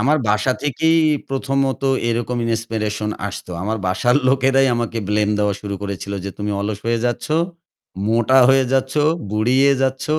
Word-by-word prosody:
আমার 140 +7 +3
বাসা 105 +5 +2
থেকেই 160 +3 +2 0.3
প্রথমত 135 0 -1 0.3
এরকম 120 +1 -1
ইন্সপিরেশন 110 -2 -2 0.2
আসতো। 90 0 -8
আমার 110 +2 -2
বাসার 120 +8 +2
লোকেরাই 135 0 +3
আমাকে 115 -1 -2
ব্লেম 105 0 +1
দেওয়া 105 -1 +1
শুরু 100 -1 -5
করেছিল 100 0 -5
যে 100 - -4
তুমি 105 0 -3
অলস 100 0 -3
হয়ে 115 0 +1
যাচ্ছ, 120 - -2 0.8
মোটা 120 +3 +3
হয়ে 135 0 +4
যাচ্ছ, 130 0 0 0.4
বুড়িয়ে 125 +6 +3
যাচ্ছ। 130 0 -1
115 Hz, 145 wpm, -20 LUFS, 105-135 Hz, 0.8 s, হয়ে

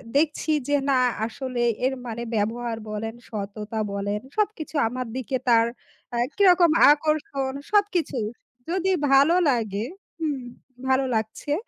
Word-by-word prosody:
দেখছি 310 +1 +1 0.2
যে 290 0 +3
না 260 -2 +4 0.3
আসলে 250 +1 -4 0.2
এর 265 - +2
মানে 235 0 -4
ব্যবহার 225 +2 -1
বলেন, 220 +1 -4 0.2
সততা 210 +1 -5
বলেন 205 +1 -2 0.2
সবকিছু 410 -7 -1
আমার 250 +1 -4
দিকে 260 0 -2
তার 230 -1 +6 0.5
অ্যা 240 - -2 0.2
কিরকম 360 -4 +6 0.2
আকর্ষণ। 290 -3 0 0.2
সবকিছু 385 -9 +2 0.5
যদি 375 +1 +1 0.2
ভালো 280 +6 +6
লাগে 220 -4 0 0.4
হুম, 290 -5 -1 0.5
ভালো 265 0 +3
লাগছে, 220 +6 -2
260 Hz, 125 wpm, -25 LUFS, 225-310 Hz, 0.5 s, তার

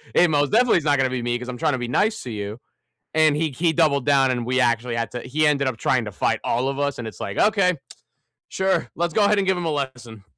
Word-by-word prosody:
It 175 -1 +5
most 145 -1 +1
definitely 240 -2 +4
is 165 - -2
not 145 -1 +3
gonna 130 -1 +1
be 130 -1 -3
me 120 0 -1
‘cause 125 0 -8
I'm 125 - -6
trying 155 0 0
to 130 - -2
be 120 - -4
nice 215 - 0
to 125 - -7
you." 105 +2 -6 0.5
And 155 -2 +3
he 155 -1 -1
he 165 +5 0
doubled 145 -6 +2
down, 135 -2 +3
and 120 -2 -2
we 130 +1 0
actually 120 0 +1
had 115 0 -3
to 125 - -5
he 150 +4 -1
ended 140 -2 +1
up 120 -4 -2
trying - - 0
to - - -6
fight - - -1
all 125 +3 0
of 140 +1 -4
us. 145 -1 -1
And 115 - -5
it's 110 - -10
like, - - -5
okay. 195 -4 +3 0.7
Sure. 190 0 0
Let's 170 0 -2
go 210 - +3
ahead 205 0 +3
and 195 - 0
give 190 - +2
him 175 - -4
a 160 - 0
lesson. 125 -7 -5
140 Hz, 280 wpm, -22 LUFS, 125-165 Hz, 0.7 s, It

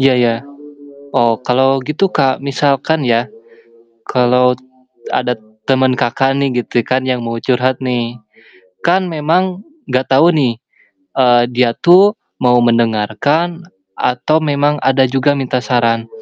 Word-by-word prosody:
Iya 135 -1 +4
ya. 115 -1 +2 0.8
Oh 120 -1 +3
kalau 130 +1 +2
gitu 155 +6 +1
Kak, 135 -2 +2
misalkan 140 +2 0
ya. 120 -1 +1 0.9
Kalau 125 0 +3 0.6
ada 125 0 0 0.4
temen 130 -1 +3
Kakak 130 +2 0
nih 140 -1 +1
gitu 120 - -1
kan, 130 +3 -1
yang 125 -1 -1
mau 115 0 -4
curhat 125 +1 0
nih. 120 -2 -3 0.7
Kan 185 +2 +2
memang 180 +5 -1 0.3
enggak 130 +1 -1
tahu 135 +5 +5
nih, 135 -7 +1 0.6
eee, 120 -2 +4
dia 125 -1 +2
tuh 195 +5 +5 0.2
mau 125 -1 +3
mendengarkan 120 - 0 0.4
atau 125 +5 +1
memang 145 -1 0
ada 135 0 +2
juga 135 +2 +1
minta 130 -2 -2
saran. 115 -3 0
130 Hz, 130 wpm, -15 LUFS, 120-145 Hz, 0.9 s, tahu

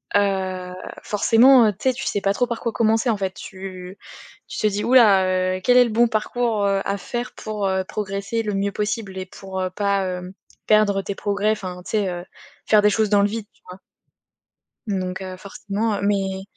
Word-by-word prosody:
Heu, 190 -2 0 0.3
forcément, 230 +3 +5
heu, 210 - +1
tu - - -27
sais, - - +1
tu 265 - -6
sais 205 - -1
pas 195 0 +1
trop 245 +3 0
par 235 -2 -4
quoi 230 -2 -2
commencer, 225 +1 +2
en 215 - +1
fait, 190 -1 -2
tu 185 -1 -9 0.5
tu - - -6
te 215 - +2
dis: 205 0 -1
«Ouh 250 - +1
là, 200 -7 +6 0.3
heu, - - -10
quel 250 0 +5
est 250 - +7
le - - -3
bon 235 +2 +4
parcours, 220 -1 0
heu, 195 -1 +1
à 200 0 -1
faire 240 +6 -5
pour, 210 -2 -3
heu, 190 0 0
progresser 200 +3 -3
le 210 -1 -2
mieux 200 +1 0
possible 210 -2 -3
et 185 - -4
pour, 190 0 -7
heu, 185 - -1
pas, 200 0 0
hem, 180 0 -5 0.3
perdre 205 -2 +3
tes 195 - -5
progrès», 205 +1 0
enfin, 185 -4 -5
tu - - -7
sais, 205 -4 +1
heu, 175 0 -5 0.4
faire 215 -1 +5
des 210 - +5
choses 215 -1 +1
dans 205 -1 +4
le 200 - +3
vide, 220 -1 -5
tu - - -32
vois? 185 +1 -10 1.1
Donc, 185 -2 -3
heu, 185 -1 -7
forcément, 205 +2 -3
heu, - - -4
mais 195 -1 0
200 Hz, 215 wpm, -22 LUFS, 190-215 Hz, 1.1 s, est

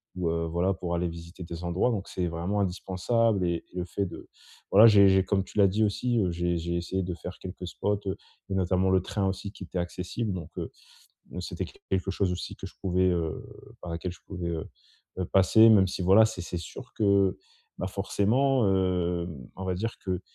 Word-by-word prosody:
ou 90 -3 -1
heu, 85 0 0
voilà, 85 +4 +1
pour 90 -2 -3
aller 85 0 0
visiter 85 +2 -9
des 85 +1 -7
endroits 90 +8 +1
donc 100 -3 -3
c'est 90 -1 -2
vraiment 85 +5 -1
indispensable 95 +2 +1
et 85 -1 -1
le 90 -1 -2
fait 100 +3 -2
de 85 - -9 0.4
voilà, 110 +4 +9
j'ai 100 -2 +7
j'ai 95 0 +4
comme 95 0 +1
tu 105 - -13
l'as 100 -1 +6
dit 105 +4 +1
aussi, 120 +4 0
heu, 90 -4 +1
j'ai 85 0 0
j'ai 85 +1 -2
essayé 95 +2 -2
de 90 0 -3
faire 90 +1 -8
quelques 90 -1 -7
spots, 105 +2 -1
heu 95 - -1 0.3
et - - -3
notamment 95 0 +2
le 95 0 +4
train 95 +2 -1
aussi 95 +1 -3
qui 95 - -9
était 90 - -6
accessible 90 +5 -3
donc, 85 -4 -6
heu, - - -4 0.6
m - - -4
c'était - - -4
q - - -15 0.2
quelque 95 0 0
chose 95 -1 0
aussi 90 - -5
que 95 - -7
je - - -11
pouvais, 95 -1 +2
heu, 85 -3 -2 0.4
par 90 - -6
laquelle 85 +2 -4
je - - -15
pouvais, 90 -3 -4
heu 80 -2 -3 0.5
heu, 90 - -1
passer 110 +5 +6
même 100 -4 +6
si, 90 - -5
voilà, 95 +5 +7
c'est 110 -4 -2
c'est 90 - -5
sûr 85 - -10
que, 100 -2 +3 0.4
bah, 95 - -2
forcément, 110 +6 +2
hem, 90 -2 0 0.3
on 95 - -5
va 95 -1 -1
dire 115 +5 -3
que 90 -1 -2
95 Hz, 220 wpm, -28 LUFS, 90-100 Hz, 0.6 s, voilà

